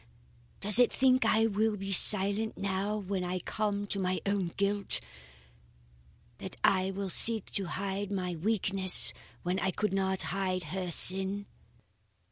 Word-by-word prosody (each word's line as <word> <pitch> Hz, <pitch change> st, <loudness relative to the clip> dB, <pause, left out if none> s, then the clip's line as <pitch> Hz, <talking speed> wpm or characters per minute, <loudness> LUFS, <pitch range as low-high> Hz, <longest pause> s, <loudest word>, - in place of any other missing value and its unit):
Does 205 Hz, +2 st, +6 dB
it 245 Hz, -, +4 dB
think 260 Hz, -1 st, +1 dB
I 220 Hz, +1 st, +2 dB
will 215 Hz, 0 st, -1 dB
be 195 Hz, 0 st, -7 dB
silent 205 Hz, +3 st, +4 dB
now 200 Hz, +2 st, -3 dB
when 195 Hz, -2 st, -5 dB
I 180 Hz, +1 st, -4 dB
come 205 Hz, +2 st, -4 dB
to 200 Hz, 0 st, -3 dB
my 185 Hz, 0 st, -2 dB
own 200 Hz, -2 st, -2 dB
guilt? 200 Hz, 0 st, 0 dB, 1.4 s
That -, -, -9 dB
I 185 Hz, 0 st, +1 dB
will 195 Hz, -1 st, -5 dB
seek 225 Hz, +3 st, +3 dB
to 195 Hz, -, -1 dB
hide 195 Hz, +2 st, -5 dB
my 180 Hz, -3 st, -4 dB
weakness 190 Hz, 0 st, +2 dB, 0.3 s
when 180 Hz, +2 st, -2 dB
I 190 Hz, +1 st, -1 dB
could 205 Hz, +1 st, -3 dB
not 190 Hz, -1 st, -1 dB
hide 185 Hz, -2 st, -3 dB
her 185 Hz, -2 st, -4 dB
sin?" 190 Hz, +4 st, +4 dB
195 Hz, 145 wpm, -29 LUFS, 185-205 Hz, 1.4 s, Does